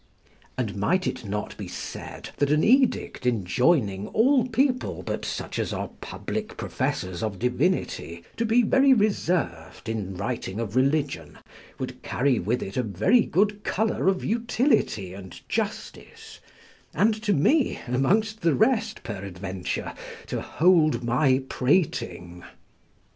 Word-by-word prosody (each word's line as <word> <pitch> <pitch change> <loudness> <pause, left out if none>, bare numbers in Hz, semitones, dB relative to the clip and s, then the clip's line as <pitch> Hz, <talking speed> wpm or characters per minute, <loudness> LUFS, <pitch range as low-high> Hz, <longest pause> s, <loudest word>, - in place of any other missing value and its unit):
And 110 -5 -2
might 180 - +1
it 130 -2 -3
not 105 +1 -4
be - - -6
said, - - -7
that 145 - +1
an 150 +1 +3
edict 250 - +2
enjoining 105 - +1
all 255 +2 +3
people 255 +2 0
but - - -3
such - - -4
as - - -1
are - - -3
public 220 0 -5
professors 100 -11 -2
of 110 -3 -2
divinity, 125 - -1
to 230 - +1
be 230 +2 +3
very 265 +3 +5
reserved 175 - -1
in 100 -4 -3
writing 110 -1 -3
of 115 -2 -4
religion, 135 - 0 0.4
would - - -6
carry 130 0 +1
with 115 +7 -1
it 95 - -6
a - - +3
very 110 - +3
good 205 +3 +1
colour 220 -1 0
of 190 -1 +1
utility 225 - +1
and 95 -1 -11
justice - - -5 0.6
and 210 +7 +4
to 215 -1 0
me, 250 - +2
amongst 200 - +1
the 165 -4 +3
rest 225 - +1
peradventure, 95 -3 -5 0.3
to - - -3
hold 160 -5 +3
my 130 +2 +2
prating? 125 - -1
135 Hz, 130 wpm, -25 LUFS, -, 0.6 s, very